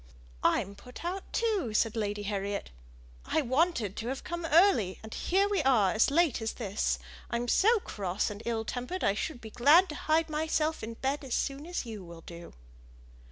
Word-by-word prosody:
"I'm 195 - +1
put 250 +9 -11
out 370 +2 -4
too," 405 - 0
said 225 +1 +2
Lady 205 -2 -2
Harriet. 200 - -3 0.5
"I 315 - 0
wanted 260 - +1
to 225 - -4
have 265 +2 -3
come 345 -1 -4
early, 295 - +4
and 220 - -8
here 390 +3 +2
we 405 -4 +1
are 240 -9 +4
as 220 - +3
late 300 -5 +2
as 225 - -2
this. 210 -3 -1 0.3
I'm 235 +1 -2
so 440 - +4
cross 195 - -2
and 205 +1 -8
ill 225 -1 -2
tempered, 250 +12 -4
I 195 - +3
should 245 +6 -4
be 220 - -9
glad 310 - +6
to 300 - -5
hide 320 +1 +4
myself 315 0 0
in 230 +1 -6
bed 275 +4 -2
as 260 -3 -2
soon 280 +3 -2
as 350 -6 -3
you 220 -4 -7
will 170 -1 -11
do." 170 +1 -11
245 Hz, 190 wpm, -30 LUFS, 210-320 Hz, 0.5 s, glad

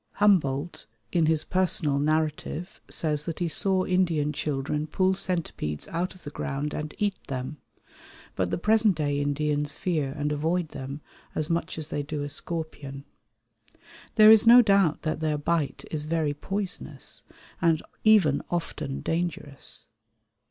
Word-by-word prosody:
Humboldt, 170 - +2 0.2
in 165 -3 +3
his 160 -1 +2
Personal 170 -6 +1
Narrative, 155 +3 -1
says 150 -2 0
that 165 - -4
he 175 - 0
saw 185 +3 +3
Indian 170 -5 +1
children 150 +1 -2
pull 185 +4 +2
centipedes 170 - -3
out 175 +3 -2
of 185 - -18
the 145 - -7
ground 145 +1 -3
and 150 0 -5
eat 205 -2 -1
them; 130 +2 -4 0.8
but 90 -1 0
the - - -1
present 215 +1 +3
day 145 -2 0
Indians 145 0 -1
fear 155 -7 -1
and 150 0 -1
avoid 160 +3 0
them 140 +1 -7 0.3
as 155 +1 -1
much 165 -1 -1
as 155 -1 -5
they 145 - -2
do 145 0 -4
a 145 - -4
scorpion. 145 -3 -6 1.1
There 215 -1 +9
is 220 +1 +6
no 240 +1 +10
doubt 195 -7 +3
that 155 -1 -1
their 155 -1 0
bite 150 0 -1
is 150 -1 -2
very 155 -2 0
poisonous, 195 +5 -4 0.4
and 165 -2 +3 0.2
even 195 -10 +5
often 155 -5 -3
dangerous. 165 -5 -3
155 Hz, 145 wpm, -27 LUFS, 145-180 Hz, 1.1 s, no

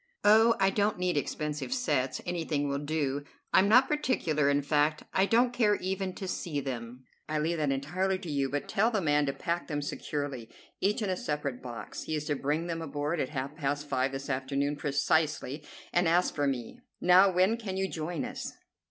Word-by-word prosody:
"Oh, 220 +2 +6
I 195 0 +4
don't 205 +1 +1
need 180 -1 0
expensive 150 - -2
sets; 145 - 0
anything 160 -4 -1
will 140 0 -1
do. 145 -2 -1 0.3
I'm 195 +2 +5
not 250 +4 +7
particular; 160 - +1
in 145 0 +2
fact, 150 +1 +1
I 190 +1 +3
don't 240 +3 +3
care 215 -4 +3
even 190 -1 -3
to 190 - -5
see 170 -4 -2
them; 125 -2 -6 0.3
I 155 - 0
leave 165 +3 0
that 150 -2 0
entirely 180 +8 0
to 175 -4 -7
you, 140 -2 0
but 145 +2 -3
tell 220 +4 +2
the 220 -3 0
man 150 -4 +2
to 140 - 0
pack 170 +4 -2
them 145 -2 -2
securely, 140 -5 -4 0.3
each 210 +3 +1
in 195 - 0
a - - +1
separate 145 -6 -3
box. 120 -4 -7
He 155 - -3
is 150 -1 -3
to 150 -1 0
bring 150 +4 -1
them 165 -1 -3
aboard 150 +1 -2
at 130 - -1
half 140 0 -4
past 145 -1 -2
five 135 -1 0
this 135 0 -5
afternoon 140 +2 -1
precisely, 150 0 0 0.3
and 175 0 +3
ask 175 +2 +3
for 145 -1 0
me. 125 -4 -3 0.2
Now, 185 +2 +6
when 185 +5 +3
can 205 -5 -5
you 190 0 0
join 170 +7 -3
us?" 255 +1 -6
155 Hz, 200 wpm, -30 LUFS, 140-190 Hz, 0.3 s, not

